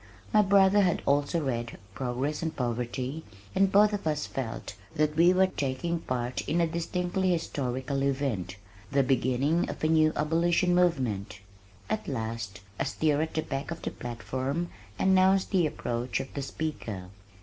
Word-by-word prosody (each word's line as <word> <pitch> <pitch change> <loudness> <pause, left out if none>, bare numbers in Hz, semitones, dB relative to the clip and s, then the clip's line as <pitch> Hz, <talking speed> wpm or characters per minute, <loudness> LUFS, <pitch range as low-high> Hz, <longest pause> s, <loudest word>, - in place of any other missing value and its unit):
My 215 - +7
brother 200 0 +5
had 180 -3 +1
also 145 +3 +1
read 120 -3 -2 0.2
Progress 130 +6 -2
and 160 -1 -2
Poverty 125 +4 -2 0.3
and 195 0 +3
both 210 +1 +5
of 200 -5 -2
us 150 -1 0
felt 130 -4 -5 0.2
that 150 0 +1
we 170 +3 +6
were 185 +1 +5
taking 170 0 -2
part 125 -4 -2
in 170 - +2
a 170 - +4
distinctly 180 +3 -1
historical 135 -5 -1
event, 130 -10 -1 0.4
the 140 0 +3
beginning 135 +5 +1
of - - -6
a - - +4
new 155 -1 +4
abolition 170 +3 +2
movement. 130 - +1 0.5
At 215 - -2
last, 110 -5 -4 0.2
a - - +1
stir 155 -1 +1
at 160 - -3
the 160 - 0
back 135 0 -4
of 165 0 -6
the - - -2
platform 130 +7 -3 0.3
announced 190 0 +4
the 180 -5 +3
approach 120 -3 -2
of 135 - -6
the 140 - -3
speaker. 130 -10 -4
150 Hz, 160 wpm, -28 LUFS, 125-175 Hz, 0.5 s, My